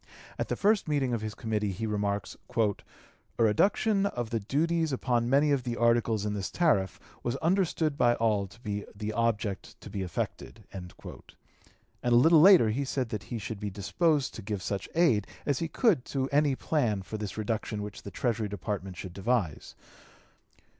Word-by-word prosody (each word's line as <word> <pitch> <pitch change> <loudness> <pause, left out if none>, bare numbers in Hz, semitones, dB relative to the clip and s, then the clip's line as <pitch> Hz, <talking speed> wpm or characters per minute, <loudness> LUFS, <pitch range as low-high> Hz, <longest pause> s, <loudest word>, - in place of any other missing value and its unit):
At - - -1
the - - -1
first 210 -1 +2
meeting 140 -5 +1
of 115 - -1
his 110 -1 -5
committee 105 -2 -1
he 105 +5 -4
remarks: 105 -2 -2 0.2
"A 110 -3 +3 0.6
reduction 195 - +3
of 120 - -4
the 115 - 0
duties 160 +8 0
upon 120 -2 0
many 145 +3 +4
of 140 -2 +2
the 120 -1 -4
articles 115 -3 +2
in 105 - -1
the 100 - -3
tariff 95 - +1 0.2
was 120 +1 -2
understood 160 -2 +1
by 120 -1 +4
all 105 -4 +1
to 105 - -17
be 105 -3 -3
the 105 +1 -4
object 110 -3 -1
to - - -11
be 100 - -3
effected;" 90 -3 -5
and 90 -2 -7 1.1
a 120 - +1
little 155 +6 +7
later 175 - +7
he 135 +6 -1
said 130 -2 -2
that 105 -3 -5
he 120 - -3
should 110 0 -5
be 105 0 -3
disposed 140 - 0
to - - -7
give 100 -1 -4
such 100 -2 -3
aid 150 - +3 0.2
as 145 -3 +1
he 165 - -1
could 185 - +2
to 135 -1 -1
any 145 -1 +3
plan 115 -11 0
for 110 +3 -6
this 105 0 -5
reduction 110 -1 -2
which 105 -1 -8
the - - -8
Treasury 115 +1 -1
Department 100 -2 -5
should 90 -1 -7
devise. 100 -5 -1
115 Hz, 180 wpm, -29 LUFS, 105-140 Hz, 1.1 s, little